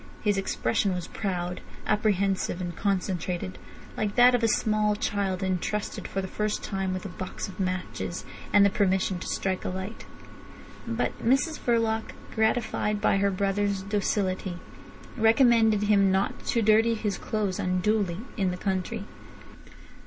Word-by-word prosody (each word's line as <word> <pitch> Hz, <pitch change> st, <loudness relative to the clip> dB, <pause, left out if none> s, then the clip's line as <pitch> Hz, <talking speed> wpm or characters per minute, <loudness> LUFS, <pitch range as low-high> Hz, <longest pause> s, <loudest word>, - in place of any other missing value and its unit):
His 205 Hz, -2 st, +3 dB
expression 190 Hz, -, 0 dB
was 180 Hz, -2 st, -4 dB
proud, 180 Hz, -3 st, -3 dB, 0.2 s
apprehensive, 200 Hz, -3 st, +1 dB
and 175 Hz, -2 st, -4 dB
concentrated, 185 Hz, -2 st, -2 dB, 0.4 s
like 210 Hz, -1 st, -2 dB
that 245 Hz, 0 st, +7 dB
of 245 Hz, -, +2 dB
a 230 Hz, -, +3 dB
small 215 Hz, -1 st, +2 dB
child 200 Hz, -3 st, -1 dB
entrusted 190 Hz, +3 st, -2 dB
for 195 Hz, -, -3 dB
the -, -, -3 dB
first 210 Hz, +2 st, -2 dB
time 195 Hz, -2 st, -2 dB
with 185 Hz, +2 st, -4 dB
a -, -, -4 dB
box 185 Hz, +3 st, -5 dB
of 190 Hz, -1 st, -11 dB
matches 185 Hz, -, -3 dB, 0.3 s
and 205 Hz, -1 st, +6 dB
the 200 Hz, -, +4 dB
permission 190 Hz, -2 st, +1 dB
to -, -, -6 dB
strike 190 Hz, -1 st, -1 dB
a -, -, -2 dB
light. 190 Hz, +4 st, -6 dB, 0.8 s
But 230 Hz, +1 st, -2 dB
Mrs 275 Hz, +6 st, +2 dB
Verloc, 225 Hz, -2 st, 0 dB, 0.2 s
gratified 220 Hz, -1 st, +1 dB
by 205 Hz, -, +3 dB
her 200 Hz, 0 st, +2 dB
brother's 195 Hz, 0 st, 0 dB
docility, 190 Hz, -2 st, -1 dB, 0.6 s
recommended 225 Hz, -2 st, +4 dB
him 200 Hz, -2 st, +4 dB
not 190 Hz, +1 st, -1 dB
to 230 Hz, -, +2 dB
dirty 220 Hz, +2 st, +4 dB
his 210 Hz, -3 st, -2 dB
clothes 205 Hz, -4 st, -2 dB
unduly 185 Hz, 0 st, 0 dB, 0.2 s
in 195 Hz, -3 st, +1 dB
the 180 Hz, -, -3 dB
country. 195 Hz, +3 st, -2 dB
200 Hz, 145 wpm, -27 LUFS, 185-215 Hz, 0.8 s, that